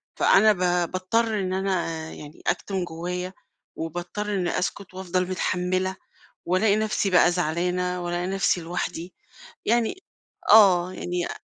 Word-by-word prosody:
فأنا 215 0 +5
ب 180 -2 +1
باضطر 215 +4 0
إن 185 -1 -2
أنا 190 0 0 0.3
يعني 150 +1 -11
أكتم 190 -2 -1
جوايّا، 180 +2 -5 0.4
وباضطر 175 +6 -4
إني 180 -2 0
أسكت 190 +1 -4
وافضل 185 -1 -2
متحملة، 185 +1 -1 0.5
والاقي 200 +4 +3
نفسي 215 -2 0
بقى 180 -1 +5
زعلانة، 180 +2 -1
والاقي 175 0 -2
نفسي 195 -1 +1
لوحدي 170 +1 -4 0.5
يعني 235 - +1 0.5
آه، 185 -4 +6
يعني 175 -1 -3
أ - - -7
185 Hz, 125 wpm, -25 LUFS, 175-195 Hz, 0.5 s, آه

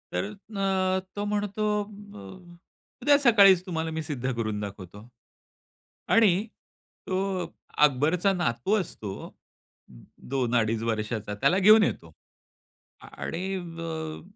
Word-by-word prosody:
तर - - 0
अ, 195 -2 -1 0.2
तो 205 0 -3
म्हणतो 205 0 -2 0.2
अ, - - -11
ब, 205 -1 -13
अ, 175 - -12 0.4
"उद्या 285 +3 +5
सकाळीच 200 -8 +6
तुम्हाला 165 -3 -3
मी 160 0 -3
सिद्ध 135 -4 -3
करून 110 -3 -2
दाखवतो." 100 +1 -9 1.1
आणि 215 -1 +4 0.6
तो 190 -1 -1 0.4
अकबरचा 155 +8 +1
नातू 175 - 0
असतो, 110 - -6 1.2
2-2.5 115 -4 +1
वर्षाचा. 110 -2 -3
त्याला 175 - +2
घेऊन 215 +3 +7
येतो. 80 - -3 0.9
आणि 185 +3 -5
अ, 165 -3 -6
175 Hz, 110 wpm, -26 LUFS, 120-195 Hz, 1.2 s, घेऊन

